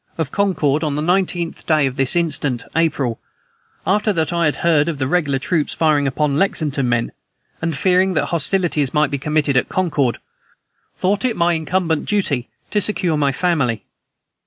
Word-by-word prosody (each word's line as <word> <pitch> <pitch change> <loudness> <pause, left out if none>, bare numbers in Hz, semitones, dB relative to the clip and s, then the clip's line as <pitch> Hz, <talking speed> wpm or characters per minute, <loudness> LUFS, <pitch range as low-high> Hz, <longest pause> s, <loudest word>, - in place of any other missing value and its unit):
of 160 -4 -2
Concord, 165 -7 +1
on 150 -2 -1
the 150 - -1
19th 175 -1 -1
day 155 -3 +3
of 130 -1 -2
this 135 +3 +3
instant, 150 -7 0
April, 145 -8 0 0.7
after 210 +3 +2
that 165 -3 -1
I 170 -1 +1
had 150 - +1
heard 165 -2 +2
of 160 - -3
the 135 - -1
regular 145 -2 +1
troops 150 +3 -1
firing 150 -3 +2
upon 145 +2 0
Lexington 145 -9 0
men, 120 -1 0 0.5
and 165 -3 -2
fearing 185 +3 +2
that - - +1
hostilities 165 -4 0
might 150 -1 +2
be 140 - -2
committed 150 -1 0
at 125 - +2
Concord, 145 -9 0 0.8
thought 195 +2 0
it 250 -3 0
my 170 0 +2
incumbent 160 0 -1
duty 155 -12 -1 0.2
to 210 - +1
secure 185 -5 +1
my 145 -2 +1
family. 135 -7 0
155 Hz, 170 wpm, -19 LUFS, 140-180 Hz, 0.8 s, day